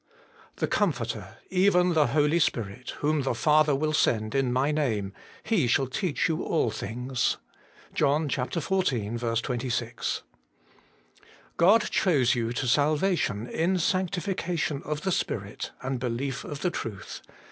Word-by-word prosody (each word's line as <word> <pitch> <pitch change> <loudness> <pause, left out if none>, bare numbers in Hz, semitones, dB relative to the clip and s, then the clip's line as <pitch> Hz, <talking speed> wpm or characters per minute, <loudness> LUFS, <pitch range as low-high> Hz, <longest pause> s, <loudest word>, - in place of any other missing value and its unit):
'The - - 0
Comforter, - - -1
even 180 -1 +4
the 155 -3 +4
Holy 150 +5 +2
Spirit, 115 -4 -2
whom 150 0 +2
the 130 -2 -1
Father 150 +2 +4
will 155 +2 0
send 110 -7 +1
in 135 -2 +1
my 130 +4 +2
name, 110 -10 -1 0.3
He 200 - +2
shall 135 +3 +3
teach 145 +7 -1
yon 160 0 -1
all 155 -9 +1
things. 125 +3 -2 0.6
1 150 +3 +2
JOHN - - -4
ziv. 125 - -1
26. 120 -1 -2 1.3
God 200 +6 +6
chose 140 - +3
you 115 -2 -1
to 120 +2 -2
salvation 145 - +1
in 170 +8 0
sanctification 180 -4 -1
of 150 0 -3
the 190 - -1
Spirit, 100 - -3
and 130 -1 -2
belief 130 +2 -3
of 145 -2 -7
the 180 - +1
truth.' 105 - -6
140 Hz, 135 wpm, -27 LUFS, 120-165 Hz, 1.3 s, God